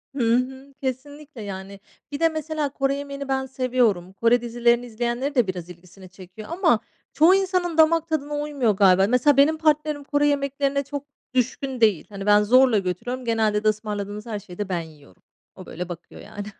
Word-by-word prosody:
Hı 235 -4 +2
hı. 265 +2 -3
Kesinlikle 275 +1 -6
yani. 195 -1 -7 0.3
Bir 285 - -4
de, 330 - +4
mesela, 315 -2 -3
Kore 275 0 -1
yemeğini 280 0 -6
ben 265 0 -1
seviyorum. 245 -8 0
Kore 230 +4 +2
dizilerini 240 0 +1
izleyenlerin 240 +4 -3
de, 245 -5 +3
biraz 180 -2 -5
ilgisini 180 +2 -14
çekiyor, 185 +3 -12
ama, 335 - +2 0.3
çoğu 330 +5 +6
insanın 365 -3 0
damak 325 +1 +4
tadına 295 -2 -2
uymuyor 290 -6 0
galiba. 190 -1 +4
Mesela 250 +3 +3
benim 300 +3 +5
partnerim, 305 -2 +1
Kore 290 +1 +1
yemeklerine 280 0 0
çok 285 +1 -6 0.3
düşkün 255 +1 -1
değil. 210 -8 +3
Hani, 200 -1 -7
ben 210 0 +5
zorla 250 +1 +5
götürüyorum. 220 +8 -4
Genelde 220 -2 +1
de, - - +1
ısmarladığınız 210 -1 -3
her 220 -3 -4
şeyi 185 -3 -13
de 205 -2 -4
ben 175 -2 -1
yiyorum. 150 - -16 0.3
O, - - -11
böyle, 180 +2 -7
bakıyor 175 -1 -10
yani. 205 0 -8
245 Hz, 175 wpm, -23 LUFS, 205-285 Hz, 0.3 s, çoğu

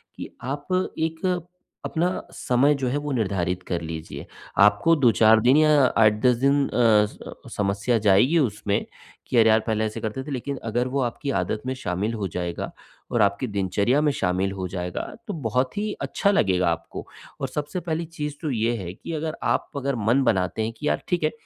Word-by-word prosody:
कि - - -7
आप 145 +3 -4 0.3
एक 160 +2 -2 0.6
अपना 175 +2 0 0.2
समय 130 +4 +2
जो 135 -2 -2
है 135 - 0
वो 145 0 -4
निर्धारित 95 -6 -1
कर 85 -2 -2
लीजिए। 80 0 -7 0.3
आपको 105 +11 +5
2-4 115 -5 +5
दिन 125 +5 +5
या 155 -2 +5
8-10 110 +3 +4
दिन 140 +2 +2
अ, 110 -3 +4
स - - -15 0.4
समस्या 100 +4 +1
जाएगी 110 - +4
उसमें, 105 -6 0 0.4
कि 125 - 0
अरे, 110 -1 +6
यार 110 - +5
पहले 110 -1 +1
ऐसे 110 - -4
करते 110 +4 -3
थे 145 - -8
लेकिन 140 +1 -3
अगर 120 +3 -1
वो 135 +2 -1
आपकी 125 +3 -2
आदत 110 - -3
में 130 - -1
शामिल 100 -1 -2
हो 105 -4 -2
जाएगा 85 -1 -4 0.4
और 120 - +2
आपकी 100 +5 +1
दिनचर्या 100 +6 +1
में 150 -1 +3
शामिल 95 -2 0
हो 95 -1 -4
जाएगा, 90 -1 -4 0.3
तो 205 - -3
बहुत 130 - -1
ही 210 +1 -1
अच्छा 200 - +1
लगेगा 90 - +2
आपको। 85 0 -5 0.3
और - - 0
सबसे 150 +4 -3
पहली 165 0 -2
चीज़ 150 -3 -5
तो 155 -4 -2
ये 115 0 0
है 90 -4 -6
कि 145 - -8
अगर 155 0 -3
आप - - 0
अगर 140 0 -1
मन 120 +4 +2
बनाते 95 -2 +1
हैं, 115 +1 -3
कि 150 +5 -5
यार, - - +1
ठीक 175 -3 0
है 155 - +2
120 Hz, 195 wpm, -24 LUFS, 100-145 Hz, 0.6 s, अरे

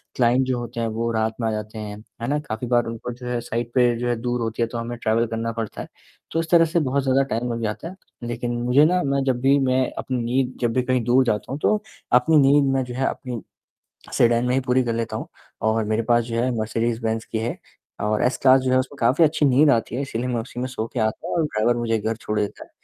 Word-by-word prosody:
Client 125 +1 +3
जो 125 -2 0
होते 120 0 -6
हैं 115 - 0
वो 115 +1 -2
रात 110 0 0
में 115 - +1
आ 110 - 0
जाते 110 +1 -5
हैं, 105 -1 -6 0.2
है 120 - -2
ना? 150 +1 +1
काफ़ी 120 -4 -5
बार 120 -1 +2
उनको 115 +2 -5
जो 125 0 -9
है 120 -1 -1
साइट 120 0 -3
पे 120 -2 +4
जो 120 +1 -2
है 120 - +1
दूर 120 0 -1
होती 115 +1 -3
है 115 - +2
तो 115 - -6
हमें 120 +1 -4
ट्रैवल 115 0 +1
करना 115 +1 -3
पड़ता 115 -2 -5
है - - -7 0.4
तो 165 - 0
इस 165 -1 -3
तरह 165 -1 +7
से 165 +1 +1
बहुत 140 -1 0
ज़्यादा 135 +1 +3
टाइम 120 +2 -1
लग 115 - -4
जाता 110 +9 -3
है 185 - -9 0.3
लेकिन 120 0 -3
मुझे 125 +5 +5
ना 180 +2 +2
मैं 140 0 0
जब 130 -2 0
भी 135 +1 +4
मैं 130 -1 +2 0.2
अपनी 130 -1 -2
नींद 130 +2 0
जब 115 -2 +1
भी 130 - +2
कहीं 130 -1 +1
दूर 125 +3 +4
जाता 105 0 -1
हूँ 140 - -3
तो, 215 +4 +1 0.3
अपनी 125 +6 +5
नींद 140 0 +5
में 135 -1 +1
जो 125 -1 -7
है 135 +1 0
अपनी 120 -5 -4 0.7
सेडान 120 0 +3
मैं 125 - +1
ही 135 - +2
पूरी 125 +1 +3
कर 115 - -1
लेता 115 0 -2
हूँ - - -6 0.3
और 110 0 +1
मेरे 110 +2 0
पास 120 -1 +4
जो 115 -1 -4
है 130 - +1
मर्सिडीज़ 115 +1 -1
बेंज 110 0 -1
की 110 - -4
है 115 +2 -3 0.4
और 105 0 0
एस 125 - +1
क्लास 130 0 +6
जो 130 0 -1
है 130 - +4
उसमें 135 +2 -3
काफ़ी 130 +8 +4
अच्छी 150 -1 +2
नींद 140 +3 +5
आती 115 -2 +1
है 140 - -1
इसीलिए 125 -2 -3
मैं 120 -2 -1
उसी 120 +1 -7
में 130 - -1
सो 115 -3 -4
के 125 - -2
आता 110 +9 -1
हूँ - - -2
और 165 - +2
ड्राइवर 120 -1 +1
मुझे 115 -1 0
घर 110 +1 -2
छोड़ 105 -1 -3
देता 105 -1 -3
है, - - -23
120 Hz, 275 wpm, -23 LUFS, 115-130 Hz, 0.7 s, तरह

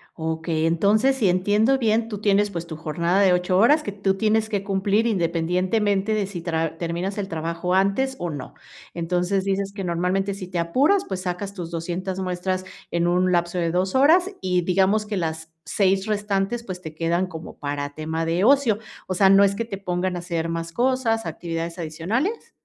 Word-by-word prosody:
Okey. 160 0 -2
Entonces, 205 +10 +3
si 215 -7 +2
entiendo 205 +8 +3
bien, 225 -2 +1
tú 210 -3 -5
tienes, 205 0 +3
pues, 170 -4 -5
tu 160 - -6
jornada 170 +5 0
de 190 -2 +5
8 180 +1 +1
horas 290 +10 +5
que 205 - -4
tú 195 -1 0
tienes 220 +1 +1
que 205 -3 -1
cumplir 200 +2 +1
independientemente 190 +2 +1
de 210 -2 0
si 185 -3 -6
tra 165 -1 -2
terminas 175 +4 -3
el 200 -2 -2
trabajo 170 +1 -3
antes, 200 +8 +1
o 175 - -2
no. 145 -5 -7 0.4
Entonces, 180 +3 0
dices 195 0 -1
que 200 -1 -5
normalmente 180 +3 0
si 190 -2 -7
te 180 -1 -3
apuras, 275 - +2
pues, 190 -1 -4
sacas 185 +2 -4
tus 175 -4 -6
200 180 +3 -3
muestras 185 0 -2 0.3
en 170 0 +1
un 180 +1 +2
lapso 175 0 0
de 170 -1 0
2 185 +4 0
horas, 335 +8 +5
y 180 -1 +1
digamos 190 +4 +2
que 210 -1 -3
las 160 -2 -3
6 195 -1 +1
restantes, 210 +1 -1
pues, 185 -5 -7
te 160 -3 -8
quedan 170 +3 0
como 165 -3 -9
para 145 0 -4
tema 160 +2 -3
de 170 +3 0
ocio. 250 -4 +4 0.3
O 185 - -2
sea, 190 +1 +4
¿no 195 +1 +7
es 200 0 +3
que 230 - -2
te 200 -4 -6
pongan 185 -1 -2
a - - -3
hacer 170 -1 -3
más 165 0 -4
cosas, 240 0 +1
actividades 165 +1 -4
adicionales? 190 - -2
185 Hz, 195 wpm, -23 LUFS, 170-205 Hz, 0.4 s, no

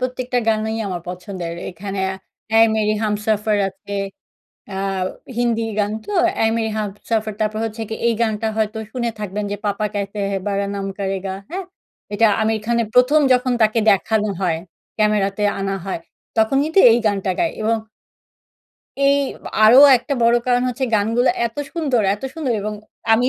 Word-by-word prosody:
প্রত্যেকটা 250 0 -2
গানই 220 0 0
আমার 180 -3 -3
পছন্দের। 180 -1 -5 0.2
এখানে 195 +2 -6 0.5
অ্যা 225 - +2
'এ - - +7
মেরি 215 0 +1
হামসফর' 210 0 0
আছে। 195 +1 -11 0.8
আ - - -5 0.6
হিন্দি 235 -2 +1 0.2
গান 205 0 +1
তো। - - -6 0.3
'এ - - +3
মেরি 220 -1 -1
হামসফর' 215 +1 -2
তারপর 215 0 0
হচ্ছে 225 0 -5
কি 220 - -3
এই 235 - +3
গানটা 220 -1 0
হয়তো 220 0 0
শুনে 240 -1 -2
থাকবেন 210 0 -3
যে - - -1
'পাপা 205 +1 0
ক্যাহেতে 200 0 -3
হে 195 - 0
বারা 200 0 0
নাম 200 -1 -3
কারে 195 -1 -2
গা।' 190 0 -3
হ্যাঁ? 375 +1 -4 0.5
এটা 225 +2 +4 0.2
আমির 220 0 +1
খানের 235 -1 +1
১ম 255 +5 +5
যখন 250 0 +1
তাকে 220 +1 +3
দেখানো 215 +2 +2
হয়, 170 -4 +1 0.4
ক্যামেরাতে 210 -1 +1 0.2
আনা 195 0 -1
হয়। 190 - -3 0.4
তখন 220 +5 +3
কিন্তু 320 +5 +2
এই 230 - +4
গানটা 195 -2 0
গায় 335 - +1
এবং 225 +1 +2 1.3
এই 280 0 +5 0.3
বা - - -5
আরো 225 +4 +8 0.2
একটা 280 +4 -3
বড় 235 +1 +5
কারণ 245 0 +3
হচ্ছে 250 +2 -2
গানগুলা 225 +4 +2 0.2
এত 230 - -9 0.2
সুন্দর 280 -9 +1
এত 205 - -13
সুন্দর! 305 -7 -1
এবং 215 0 -3 0.4
আমি 235 +2 +4
215 Hz, 165 wpm, -20 LUFS, 205-235 Hz, 1.3 s, আরো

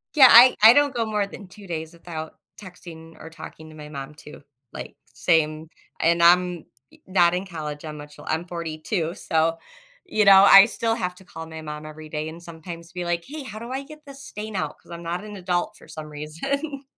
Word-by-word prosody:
Yeah, 265 -4 +9
I 245 +2 +9
I 225 - +10
don't 285 -1 +2
go 230 -1 0
more 210 -2 -1
than 200 0 -11
2 200 +1 -14
days 160 -1 -5
without 165 -2 -8 0.2
texting 165 -4 -12
or 160 - -10
talking 160 -1 -11
to 155 - -14
my 150 -1 -10
mom, 140 0 -8
too, 150 -1 -13 0.3
like, - - -9 0.2
same. 155 -1 +1 0.3
And 170 +1 +2
I'm 180 -1 +4 0.3
y - - -21
not 175 -2 +3
in 180 +2 -2
college, 155 -5 -7
I'm 155 -1 -7
much 150 0 -12
li - - -12
I'm 160 +2 -1
42 165 +1 -3
so, 165 -1 0 0.5
you 215 - +1
know, 195 -1 +8
I 195 0 +9
still 225 0 -1
have 180 -4 -3
to 190 - -18
call 165 -2 -9
my 160 0 -9
mom 150 0 -7
every 155 0 -10
day 150 0 -4
and 165 +2 -11
sometimes 170 0 -10
be 180 0 -4
like, 170 0 -1
"Hey, 300 +1 -7
how 215 -4 -8
do 235 +2 -8
I 265 +1 -3
get 305 +2 -14
this 275 -1 -12
stain 210 0 -7
out? 185 - -3
'Cause - - -18
I'm 170 0 -8
not 175 +3 -4
an 210 -1 -9
adult 180 -2 -2
for - - -17
some 155 -1 -8
reason." 275 - -5
170 Hz, 220 wpm, -23 LUFS, 160-210 Hz, 0.5 s, I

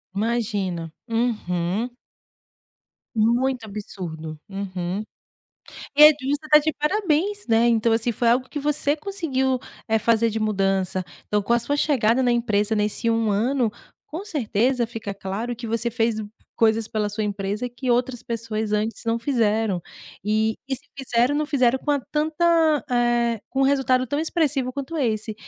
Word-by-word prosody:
Imagina, 200 -6 -1 0.2
uhum. 220 -3 -1 1.3
Muito 240 +3 +2
absurdo, 170 -7 -7
uhum. 195 -1 -4 0.9
É 300 - +10
justo, 290 0 -1
está 300 0 +7
de 305 +1 0
parabéns, 375 +4 0
né. 230 +1 +4
Então, 230 0 +3
assim 225 +1 +1
foi 235 +1 +1
algo 250 +2 +2
que 300 - -5
você 290 0 +1
conseguiu, 295 -8 -1 0.3
eh, 220 -1 +2
fazer 230 +1 +2
de 220 +1 -3
mudança. 195 -3 0 0.2
Então, 210 0 +1
com 215 - 0
a 235 - +5
sua 285 +5 -1
chegada 260 -4 +2
na 245 - +3
empresa 220 -2 +1
nesse 215 +2 0
1 225 -1 +1
ano, 235 +3 +1 0.4
com 340 +6 -6
certeza 250 - 0
fica 225 -3 -6
claro 200 +5 -4
que 235 0 -7
você 230 +1 -1
fez 225 0 0 0.4
coisas 225 -1 +3
pela 215 -2 -1
sua 210 +1 -3
empresa 205 +4 -3
que 245 +1 -3
outras 245 0 0
pessoas 220 -2 -3
antes 215 +2 -1
não 230 0 +1
fizeram 220 -6 +1 0.4
e, 215 +1 +1
e 265 - 0
se 260 - -11
fizeram, 255 0 +1
não 300 +1 0
fizeram 260 -3 +2
com 295 - -2
a 285 - +3
tanta, 315 +2 +2
eh, 240 -2 +2
com 270 - -2
um - - +5
resultado 265 -2 +2
tão 285 +4 -2
expressivo 300 -6 0
quanto 280 +4 -6
esse. 220 -4 -1
235 Hz, 155 wpm, -23 LUFS, 215-270 Hz, 1.3 s, É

